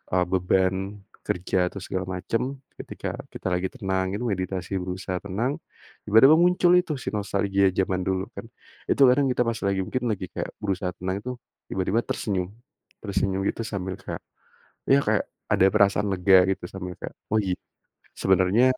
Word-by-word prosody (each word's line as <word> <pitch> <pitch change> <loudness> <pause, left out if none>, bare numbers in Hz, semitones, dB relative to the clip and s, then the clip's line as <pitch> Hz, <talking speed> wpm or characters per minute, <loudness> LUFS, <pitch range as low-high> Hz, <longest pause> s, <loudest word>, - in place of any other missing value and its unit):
eee, 90 - +4
beban 95 0 +2 0.5
kerja 90 0 0
atau 100 - -7
segala 95 0 -3
macam 125 +8 -2 0.2
ketika - - -5 0.2
kita - - -5
lagi 90 +1 0
tenang 95 -5 -1
gitu 120 +4 -2
meditasi 95 -2 -2
berusaha 90 0 -3
tenang, 110 +8 -1 0.5
tiba-tiba 115 +9 +7
muncul 175 +1 +4
itu 175 -3 -2
si - - -3
nostalgia 100 -1 +1
zaman 95 0 0
dulu 95 0 0
kan - - -6 0.5
itu - - +1
kadang 135 +2 +4
kita - - -3
pas 115 - 0
lagi 95 -1 +1
mungkin 130 -1 -2
lagi 95 -3 -3
kayak - - -4
berusaha 95 -2 -1
tenang 95 +1 -2
itu 125 - -3 0.4
tiba-tiba 95 +4 +1
tersenyum, 95 -4 -1 0.5
tersenyum 100 -2 -1
gitu - - -3
sambil 95 -3 -4
kayak, - - -6 0.7
ya 135 - +5
kayak 105 -1 +2 0.3
ada 95 - +5
perasaan 105 -1 +3
lega 95 +1 +5 0.2
gitu 90 - -10
sambil 90 -2 -6
kayak, - - -7 0.2
oh - - +4
gi 95 -2 -1 0.6
sebenernya 95 +5 +3
95 Hz, 160 wpm, -25 LUFS, 95-110 Hz, 0.7 s, tiba-tiba